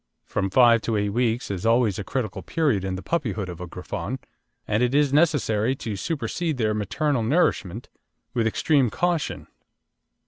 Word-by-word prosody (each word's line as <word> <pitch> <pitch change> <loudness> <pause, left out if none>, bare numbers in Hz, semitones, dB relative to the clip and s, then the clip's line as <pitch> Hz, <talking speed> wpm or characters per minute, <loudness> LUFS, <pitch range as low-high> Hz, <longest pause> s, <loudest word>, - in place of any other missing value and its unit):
From 95 - -1
five 115 +2 +5
to 115 - -1
eight 105 0 0
weeks 115 +1 0
is 95 -3 -4
always 115 -3 +2
a - - -3
critical 115 -2 -3
period 140 - 0
in 95 -1 -2
the 95 - -7
puppyhood 110 - -2
of 90 0 -8
a 90 - -5
Griffon, 90 +9 -5 0.5
and 105 +2 +1
it 125 +2 +2
is 145 -2 +3
necessary 135 -7 +2
to 110 -5 -5
supersede 160 - -2
their 110 -3 +1
maternal 120 - 0
nourishment 115 - 0 0.5
with 115 -3 +1
extreme 135 +2 +2
caution. 175 - -1
115 Hz, 165 wpm, -24 LUFS, 105-140 Hz, 0.5 s, five